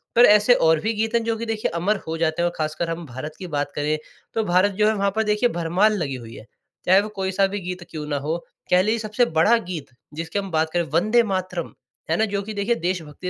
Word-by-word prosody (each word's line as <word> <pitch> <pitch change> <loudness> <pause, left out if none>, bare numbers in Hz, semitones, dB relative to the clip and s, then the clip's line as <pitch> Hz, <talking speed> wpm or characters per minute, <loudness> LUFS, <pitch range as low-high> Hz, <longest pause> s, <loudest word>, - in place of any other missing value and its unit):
पर 240 +1 +8
ऐसे 210 +3 +6
और 160 -1 +5
भी 220 +7 -1
गीत 225 +1 -1
हैं 230 - +2
जो 230 0 0
कि 230 - -4
देखिए 220 -5 -2
अमर 195 +6 +1
हो 165 0 -2
जाते 160 +1 0
हैं 175 - +2
और - - -12
खासकर 155 +2 -2
हम 165 0 -4
भारत 130 +4 -7
की 185 - -6
बात 145 -3 -2
करें, 150 +1 0 0.4
तो 225 - 0
भारत 185 +1 +3
जो 210 +2 +2
है 220 - +3
वहाँ 200 -1 0
पर 220 - +2
देखिए 210 +3 +2
भरमाल 180 +4 +2
लगी 145 -7 -2
हुई 115 -2 -9
है। 110 - -11 0.4
चाहे 190 +2 +6
वो 215 - -5
कोई 190 -1 -1
सा 195 +1 +3
भी 200 +1 -4
गीत 180 0 -5
क्यों 155 -2 -6
ना 145 -1 -1
हो, 155 +4 -2 0.3
कह 180 0 +6
लीजिए 220 +3 +1
सबसे 215 +3 +1
बड़ा 165 +6 +4
गीत 175 -9 -6 0.2
जिसकी 165 +5 -3
हम 195 -1 -5
बात 160 0 +1
करें, 175 -1 +2
वंदे 215 - +2
मातरम, 185 -4 -3 0.4
है 165 - +2
ना, 220 - +3
जो 200 -1 -2
कि 215 +2 -6
देखिए 205 +3 0
देश 180 -2 -1
भक्ति 155 +4 -9
185 Hz, 260 wpm, -23 LUFS, 160-215 Hz, 0.4 s, पर